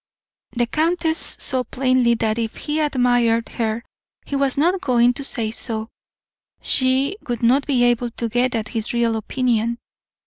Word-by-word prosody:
The 240 Hz, -1 st, +1 dB
countess 325 Hz, +4 st, +1 dB
saw 260 Hz, -2 st, +2 dB
plainly 255 Hz, -1 st, +1 dB
that 220 Hz, 0 st, -1 dB
if 225 Hz, -1 st, -3 dB
he 300 Hz, +1 st, -3 dB
admired 245 Hz, -5 st, +1 dB
her 225 Hz, -1 st, -3 dB, 0.4 s
he 280 Hz, -, -4 dB
was 275 Hz, -1 st, 0 dB
not 355 Hz, +6 st, +2 dB
going 245 Hz, -5 st, +3 dB
to 280 Hz, -, -5 dB
say 230 Hz, -5 st, +2 dB
so; 220 Hz, -1 st, -3 dB, 0.7 s
she 265 Hz, +7 st, +2 dB
would 240 Hz, -2 st, -3 dB
not 260 Hz, +4 st, +3 dB
be 255 Hz, -4 st, +2 dB
able 240 Hz, 0 st, +1 dB
to 235 Hz, 0 st, -4 dB
get 245 Hz, +2 st, 0 dB
at 220 Hz, -1 st, -3 dB
his 225 Hz, -1 st, -3 dB
real 235 Hz, -1 st, +1 dB
opinion. 235 Hz, 0 st, -1 dB
245 Hz, 160 wpm, -21 LUFS, 230-270 Hz, 0.7 s, going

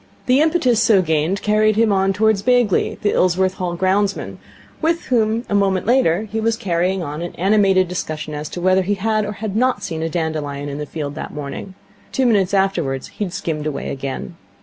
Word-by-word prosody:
The 260 Hz, +3 st, +4 dB
impetus 305 Hz, -8 st, +2 dB
so 195 Hz, -4 st, +4 dB
gained 160 Hz, +4 st, 0 dB
carried 215 Hz, 0 st, +3 dB
him 225 Hz, 0 st, +3 dB
on 195 Hz, 0 st, +2 dB
towards 215 Hz, 0 st, +2 dB
Bagley, 245 Hz, -3 st, +2 dB
the 205 Hz, -, +2 dB
Ilsworth 185 Hz, +1 st, +2 dB
Hall 180 Hz, -3 st, -2 dB
ground 195 Hz, +3 st, +1 dB
man, -, -, -7 dB, 0.4 s
with 335 Hz, +1 st, +1 dB
whom 230 Hz, -1 st, +1 dB
a -, -, -3 dB
moment 195 Hz, -2 st, +2 dB
later 215 Hz, -6 st, +3 dB
he 220 Hz, +1 st, -4 dB
was 225 Hz, 0 st, 0 dB
carrying 185 Hz, -2 st, 0 dB
on 150 Hz, +1 st, -5 dB
an 175 Hz, -, -6 dB
animated 195 Hz, 0 st, +3 dB
discussion 155 Hz, -3 st, -4 dB
as 150 Hz, 0 st, -5 dB
to 175 Hz, -, -6 dB
whether 185 Hz, +1 st, +3 dB
he 200 Hz, +2 st, 0 dB
had 215 Hz, +1 st, 0 dB
or 210 Hz, -, -4 dB
had 210 Hz, -1 st, -5 dB
not 255 Hz, +3 st, +1 dB
seen 160 Hz, -1 st, -4 dB
a 165 Hz, -, -1 dB
dandelion 150 Hz, -4 st, -3 dB
on 140 Hz, -, -5 dB
the 150 Hz, -, -5 dB
field 145 Hz, -2 st, -5 dB
that 155 Hz, -, -7 dB
morning. 150 Hz, +6 st, -6 dB, 0.4 s
Two 265 Hz, -, +1 dB
minutes 200 Hz, -6 st, +3 dB
afterwards 170 Hz, -9 st, 0 dB
he 210 Hz, -, -4 dB
had 180 Hz, -, -6 dB
skimmed 155 Hz, -3 st, -3 dB
away 150 Hz, -, -4 dB
again. 135 Hz, +5 st, -5 dB
190 Hz, 205 wpm, -20 LUFS, 165-215 Hz, 0.4 s, The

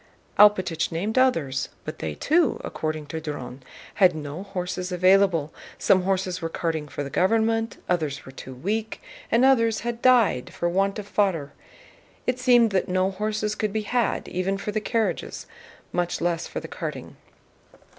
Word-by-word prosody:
Alpátych 185 Hz, -6 st, +4 dB
named 195 Hz, +7 st, -2 dB
others, 160 Hz, -, +2 dB, 0.2 s
but -, -, -6 dB
they 80 Hz, -2 st, -4 dB
too, 315 Hz, -, +2 dB
according 155 Hz, -1 st, -3 dB
to 160 Hz, +2 st, -5 dB
Dron, 145 Hz, -4 st, -6 dB, 0.3 s
had 185 Hz, -4 st, +4 dB
no 150 Hz, +2 st, -6 dB
horses 185 Hz, -2 st, -4 dB
available: 185 Hz, -3 st, +3 dB, 0.2 s
some 185 Hz, -, +4 dB
horses 185 Hz, -2 st, -1 dB
were 165 Hz, -, -2 dB
carting 160 Hz, -2 st, -2 dB
for 145 Hz, -, -5 dB
the 140 Hz, -, -7 dB
government, 225 Hz, +6 st, +1 dB
others 155 Hz, -6 st, -1 dB
were 135 Hz, -, -10 dB
too 130 Hz, 0 st, -9 dB
weak, 215 Hz, -, -3 dB, 0.3 s
and 240 Hz, +3 st, +4 dB
others 230 Hz, -5 st, +3 dB
had 235 Hz, 0 st, -4 dB
died 240 Hz, -, +4 dB
for 175 Hz, -, -2 dB
want 195 Hz, +3 st, +1 dB
of 205 Hz, -1 st, -6 dB
fodder. 175 Hz, -10 st, 0 dB, 0.7 s
It 250 Hz, 0 st, 0 dB
seemed 240 Hz, -3 st, +5 dB
that 190 Hz, -2 st, 0 dB
no 185 Hz, +1 st, +1 dB
horses 210 Hz, +2 st, -2 dB
could 215 Hz, -1 st, -2 dB
be 215 Hz, +1 st, -2 dB
had 240 Hz, +2 st, 0 dB
even 185 Hz, +2 st, -1 dB
for 205 Hz, +1 st, -4 dB
the 215 Hz, +1 st, -1 dB
carriages, 225 Hz, 0 st, -2 dB, 0.5 s
much 175 Hz, 0 st, -1 dB
less 170 Hz, -1 st, -1 dB
for -, -, -5 dB
the -, -, -8 dB
carting. -, -, -6 dB
190 Hz, 165 wpm, -25 LUFS, 165-220 Hz, 0.7 s, seemed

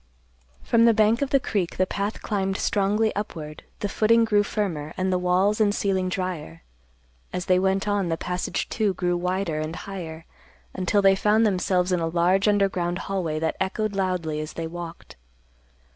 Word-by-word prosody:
From 230 Hz, 0 st, +4 dB
the 230 Hz, -1 st, +5 dB
bank 220 Hz, +3 st, +3 dB
of 280 Hz, -, 0 dB
the 275 Hz, -, +4 dB
creek 195 Hz, -8 st, -2 dB
the 185 Hz, -, +3 dB
path 200 Hz, +3 st, -3 dB
climbed 195 Hz, -2 st, -1 dB
strongly 210 Hz, +1 st, +1 dB
upward, 160 Hz, -7 st, -5 dB, 0.2 s
the 205 Hz, -, 0 dB
footing 230 Hz, +3 st, +3 dB
grew 210 Hz, -2 st, +3 dB
firmer, 175 Hz, -8 st, -3 dB
and 185 Hz, 0 st, 0 dB
the 180 Hz, -, +1 dB
walls 185 Hz, +4 st, +2 dB
and 205 Hz, -1 st, +3 dB
ceiling 190 Hz, -2 st, 0 dB
drier; 180 Hz, -, -4 dB, 0.7 s
as 180 Hz, 0 st, -3 dB
they 185 Hz, -1 st, +3 dB
went 190 Hz, +2 st, +1 dB
on, 205 Hz, -3 st, 0 dB
the 165 Hz, -, 0 dB
passage, 180 Hz, +1 st, -3 dB
too, 210 Hz, -4 st, 0 dB
grew 175 Hz, -1 st, 0 dB
wider 180 Hz, -2 st, -1 dB
and 155 Hz, +1 st, -4 dB
higher, 165 Hz, -5 st, -7 dB, 0.5 s
until 190 Hz, +2 st, +1 dB
they 195 Hz, 0 st, +6 dB
found 210 Hz, +3 st, +3 dB
themselves 185 Hz, -2 st, +1 dB
in 180 Hz, -, +2 dB
a 165 Hz, -, -1 dB
large 180 Hz, +4 st, +2 dB
underground 190 Hz, -4 st, +1 dB
hallway 180 Hz, -6 st, -2 dB
that 160 Hz, +1 st, -1 dB
echoed 205 Hz, +2 st, -1 dB
loudly 180 Hz, -5 st, -1 dB
as 155 Hz, +1 st, -5 dB
they 165 Hz, -, -4 dB
walked. 170 Hz, -, -8 dB
190 Hz, 175 wpm, -25 LUFS, 175-205 Hz, 0.7 s, they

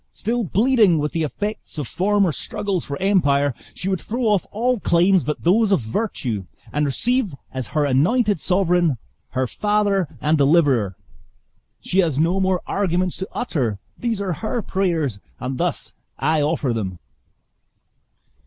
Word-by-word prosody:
still 235 Hz, +2 st, -2 dB
bleeding 215 Hz, -2 st, +3 dB
with 150 Hz, 0 st, -1 dB
the 165 Hz, -, -1 dB
effects 205 Hz, +6 st, -4 dB
of 145 Hz, -5 st, -3 dB
former 200 Hz, -, +2 dB
struggles 190 Hz, +3 st, -2 dB
for 140 Hz, -1 st, -5 dB
empire, 145 Hz, -8 st, +2 dB, 0.2 s
she 185 Hz, -, -5 dB
would 190 Hz, -2 st, 0 dB
throw 240 Hz, +3 st, -3 dB
off 210 Hz, -5 st, +2 dB
all 240 Hz, +3 st, 0 dB
claims 180 Hz, 0 st, +3 dB
but 150 Hz, -, -3 dB
those 205 Hz, +5 st, +3 dB
of 195 Hz, -, +4 dB
virtue, 115 Hz, -, -3 dB, 0.3 s
and 150 Hz, 0 st, +1 dB
receive 235 Hz, -, 0 dB, 0.2 s
as 130 Hz, -4 st, -4 dB
her 150 Hz, +7 st, 0 dB
anointed 180 Hz, -, +2 dB
sovereign, 175 Hz, -5 st, +2 dB, 0.4 s
her 130 Hz, +1 st, +1 dB
father 205 Hz, -, +1 dB
and 155 Hz, +1 st, +2 dB
deliverer! 140 Hz, -, +3 dB, 0.9 s
She 190 Hz, -, 0 dB
has 160 Hz, -7 st, +2 dB
no 170 Hz, +5 st, +2 dB
more 190 Hz, -1 st, +1 dB
arguments 185 Hz, -2 st, 0 dB
to 190 Hz, +3 st, -5 dB
utter 130 Hz, -, -1 dB, 0.2 s
these 230 Hz, -4 st, -2 dB
are 195 Hz, -3 st, -1 dB
her 220 Hz, +7 st, -3 dB
prayers, 165 Hz, -, -1 dB, 0.2 s
and 130 Hz, +1 st, -4 dB
thus -, -, -1 dB, 0.2 s
I 155 Hz, +3 st, +1 dB
offer 145 Hz, -4 st, 0 dB
them." 95 Hz, -5 st, -3 dB
175 Hz, 150 wpm, -22 LUFS, 145-205 Hz, 0.9 s, of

